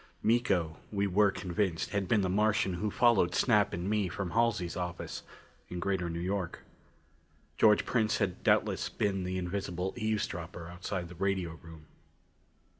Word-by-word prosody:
Miko, 95 Hz, -9 st, +2 dB
we 100 Hz, -1 st, +1 dB
were 100 Hz, +2 st, +4 dB
convinced, 90 Hz, -2 st, -2 dB
had 100 Hz, -2 st, -1 dB
been 105 Hz, +2 st, +3 dB
the 95 Hz, -, +1 dB
Martian 105 Hz, 0 st, +2 dB
who 105 Hz, +5 st, -1 dB
followed 105 Hz, -6 st, +3 dB
Snap 105 Hz, -5 st, +3 dB
and 85 Hz, +2 st, -3 dB
me 105 Hz, -3 st, +1 dB
from 90 Hz, 0 st, -4 dB
Halsey's 115 Hz, -7 st, +1 dB
office 90 Hz, 0 st, -4 dB, 0.5 s
in 90 Hz, -, -4 dB
Greater 95 Hz, -2 st, -1 dB
New 85 Hz, 0 st, -3 dB
York. 95 Hz, 0 st, -2 dB, 1.0 s
George 105 Hz, -1 st, +5 dB
Prince 110 Hz, -3 st, +1 dB
had 95 Hz, -4 st, -1 dB
doubtless -, -, +2 dB
been 95 Hz, -2 st, -1 dB
the 95 Hz, 0 st, -2 dB
invisible 90 Hz, 0 st, -3 dB
eavesdropper 95 Hz, -6 st, -3 dB
outside 90 Hz, 0 st, -4 dB
the 85 Hz, -, -10 dB
radio 95 Hz, -1 st, -1 dB
room. 80 Hz, -2 st, -12 dB
95 Hz, 150 wpm, -31 LUFS, 90-105 Hz, 1.0 s, George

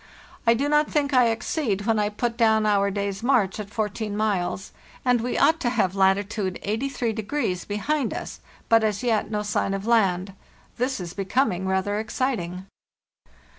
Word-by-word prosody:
"TI 230 Hz, -, +6 dB
do 280 Hz, +5 st, 0 dB
not 300 Hz, 0 st, +3 dB
think 285 Hz, -2 st, 0 dB
I 250 Hz, -2 st, +5 dB
exceed 225 Hz, -2 st, -1 dB
when 225 Hz, -1 st, +2 dB
I 210 Hz, 0 st, +1 dB
put 230 Hz, +3 st, -2 dB
down 220 Hz, -2 st, +3 dB
our 200 Hz, -1 st, +3 dB
day's 200 Hz, -1 st, -3 dB
march 230 Hz, -6 st, +2 dB
at 205 Hz, -1 st, -6 dB
14 210 Hz, 0 st, -3 dB
miles, 195 Hz, -3 st, -1 dB, 0.3 s
and 245 Hz, -2 st, +3 dB
we 245 Hz, +2 st, -2 dB
ought 320 Hz, +1 st, +4 dB
to 245 Hz, -, 0 dB
have 215 Hz, -7 st, +1 dB
latitude 195 Hz, 0 st, +1 dB
83° 225 Hz, -2 st, -2 dB
be 205 Hz, -, -3 dB
hind 280 Hz, +4 st, 0 dB
us, -, -, -6 dB, 0.3 s
but 225 Hz, -1 st, +5 dB
as 215 Hz, +2 st, 0 dB
yet 225 Hz, -4 st, +1 dB
no 210 Hz, -1 st, -2 dB
sign 205 Hz, -1 st, 0 dB
of 195 Hz, +1 st, -5 dB
land. 195 Hz, -5 st, +2 dB, 0.4 s
This 255 Hz, +1 st, -1 dB
is 175 Hz, -1 st, -6 dB
becoming 190 Hz, -2 st, 0 dB
rather 190 Hz, +2 st, 0 dB
exciting. 210 Hz, -6 st, -2 dB
215 Hz, 170 wpm, -24 LUFS, 195-240 Hz, 0.4 s, TI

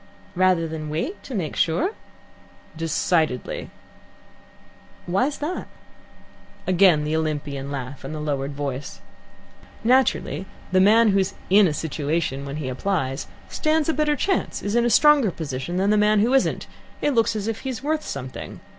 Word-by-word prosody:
"Rather 185 Hz, -2 st, +3 dB
than 155 Hz, -1 st, -5 dB
wait, 165 Hz, -, -3 dB
to 260 Hz, -, -7 dB
make 165 Hz, -7 st, -3 dB
sure?" 285 Hz, -, +1 dB, 0.8 s
"Decidedly." 160 Hz, -3 st, 0 dB, 1.4 s
"Why's 250 Hz, +11 st, 0 dB
that?" 315 Hz, +5 st, -4 dB, 1.0 s
Again 180 Hz, -4 st, +4 dB
the 155 Hz, +1 st, -1 dB
Olympian 145 Hz, -3 st, -2 dB
laugh, 135 Hz, -1 st, -6 dB
and 135 Hz, -, -6 dB
the 155 Hz, -, -5 dB
lowered 140 Hz, -2 st, -2 dB
voice. 140 Hz, -1 st, -5 dB, 0.8 s
"Naturally 250 Hz, -5 st, +2 dB, 0.2 s
the 185 Hz, 0 st, +4 dB
man 220 Hz, +3 st, +6 dB
who's 195 Hz, -1 st, +1 dB, 0.2 s
in 200 Hz, 0 st, +7 dB
a -, -, 0 dB
situation 150 Hz, -2 st, -2 dB
when 140 Hz, 0 st, -5 dB
he 150 Hz, -3 st, -4 dB
applies 135 Hz, 0 st, -2 dB, 0.2 s
stands 310 Hz, 0 st, 0 dB
a -, -, +3 dB
better 300 Hz, -1 st, +1 dB
chance, 385 Hz, +7 st, -1 dB
is 205 Hz, +2 st, -1 dB
in 240 Hz, 0 st, +3 dB
a -, -, +3 dB
stronger 290 Hz, -1 st, +5 dB
position, 160 Hz, 0 st, -4 dB
than 195 Hz, +2 st, +2 dB
the 210 Hz, -, +4 dB
man 210 Hz, 0 st, +4 dB
who 240 Hz, +5 st, +2 dB
isn't. 270 Hz, -, +2 dB, 0.3 s
It 290 Hz, -, +1 dB
looks 230 Hz, -2 st, +2 dB
as 210 Hz, 0 st, -3 dB
if 225 Hz, -1 st, -2 dB
he's 260 Hz, -2 st, -5 dB
worth 310 Hz, +1 st, 0 dB
something. 130 Hz, 0 st, -7 dB
185 Hz, 155 wpm, -23 LUFS, 150-230 Hz, 1.4 s, in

